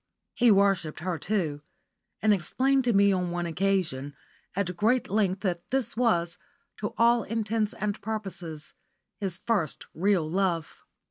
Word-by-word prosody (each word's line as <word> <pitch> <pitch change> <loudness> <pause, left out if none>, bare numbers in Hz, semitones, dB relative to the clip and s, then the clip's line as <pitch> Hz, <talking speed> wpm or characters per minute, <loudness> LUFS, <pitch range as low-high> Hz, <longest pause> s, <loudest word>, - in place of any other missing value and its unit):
He 240 -1 +4
worshipped 195 -7 +3
her 175 -1 -2
too, 170 -8 -1 0.6
and 215 -1 +5
explained 260 - +1
to 240 - +3
me 200 0 +5
on 180 -1 0
one 175 0 -2
occasion, 170 -6 -1 0.4
at 180 -2 -1
great 225 +7 +2
length, 195 -2 +1
that 175 -4 -2
this 255 -3 -1
was, 175 -8 +1 0.4
to - - -4
all 235 +1 +5
intents 220 0 -1
and 210 0 -3
purposes, 180 -7 -6 0.5
his 190 -4 -3
first 195 -7 -1
real 185 -2 +2
love. 175 -2 -1
195 Hz, 140 wpm, -27 LUFS, 170-215 Hz, 0.6 s, and